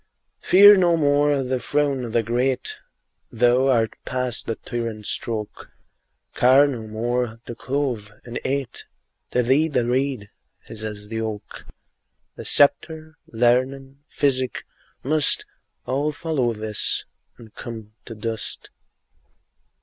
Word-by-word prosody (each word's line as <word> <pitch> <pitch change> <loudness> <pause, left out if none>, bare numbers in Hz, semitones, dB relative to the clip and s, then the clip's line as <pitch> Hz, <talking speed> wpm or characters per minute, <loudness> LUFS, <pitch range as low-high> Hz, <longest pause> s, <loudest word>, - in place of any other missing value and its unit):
Fear 205 +2 +8
no 175 -2 +3
more 145 -2 +2
the 130 0 -2
frown 145 -1 0
o' - - -6
the 115 +1 +1
great, 125 +3 -1 0.6
Thou 120 +3 +3
art 115 -4 +2
past 125 -2 -3
the 115 - -1
tyrant's 115 -4 -5
stroke; 110 -3 -4 0.6
Care 130 +3 +5
no 120 -6 -4
more 115 +1 -2
to - - -6
clothe, 125 -5 -2 0.2
and 120 0 -5
eat; 135 -1 -3 0.4
To 125 - +1
thee 135 +6 +3
the 125 -6 0
reed 125 -4 -1 0.4
is 110 -1 -8
as 105 -1 -6
the 110 0 -3
oak: 110 -2 -6 0.7
The - - -9
sceptre, 155 +2 +2
learning, 130 +4 0
physic, 130 -4 0 0.4
must 150 +2 +2 0.4
All 140 +4 -1
follow 145 -6 -1
this 110 -1 0 0.3
and 115 -2 -15
come 110 -3 -8
to 115 - -8
dust. 110 0 -5
125 Hz, 125 wpm, -23 LUFS, 115-140 Hz, 0.7 s, Fear